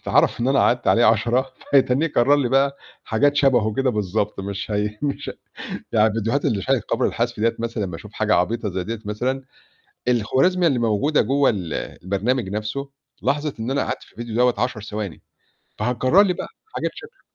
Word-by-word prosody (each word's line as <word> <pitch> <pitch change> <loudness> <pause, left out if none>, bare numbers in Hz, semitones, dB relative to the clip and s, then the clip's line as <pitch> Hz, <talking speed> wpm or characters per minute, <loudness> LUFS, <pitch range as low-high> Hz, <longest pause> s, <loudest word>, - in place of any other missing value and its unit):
اتعرَف - - +2
إن 125 - +1
أنا 135 - +3
قعدت 120 0 +2
عليه 120 - +5
10، 120 +4 +2 0.2
فهيتّنيه 135 +2 +4
يكرّر 140 -2 +3
لي 135 -4 +1
بقى 140 +1 +2 0.3
حاجات 145 +6 +2
شَبهُه 125 -6 +3
كده 135 -1 +1
بالضبط، 105 -1 -1
مش 100 +2 -5
هي 105 0 -1
مش 145 -1 -2 0.6
يعني 110 0 +4
الفيديوهات 115 +5 -1
اللي 110 -9 +1
شاهد 130 +3 +1
قبل - - 0
الحذف 120 0 -1
ديّة 115 +2 +2
مثلًا 115 -3 -2
باشوف 90 +4 -8
حاجة 110 0 +2
عبيطة 105 +4 0
زي 90 0 -3
ديّة 115 +2 -4
مثلًا. 125 +6 -2 0.6
الخوارزمية 135 - +3
اللي 135 -6 +1
موجودة 115 +7 +2
جوا 135 +4 +3
ال 90 -8 -3 0.3
البرنامج 100 +4 0
نَفْسه 105 +7 -4 0.3
لاحظِت 145 0 -1
إن 115 +4 -3
أنا 140 - +1
قعدت - - -4
في - - -20
الفيديو 120 -2 -7
دوّة 125 +1 +4
10 125 -3 -1
ثواني، 105 -4 -5 0.6
فهتكرّر 125 - +3
لي 190 -3 +1
بقى - - -6 0.3
حاجات - - -1
شَكلُه. - - -13
120 Hz, 180 wpm, -22 LUFS, 105-135 Hz, 0.6 s, عليه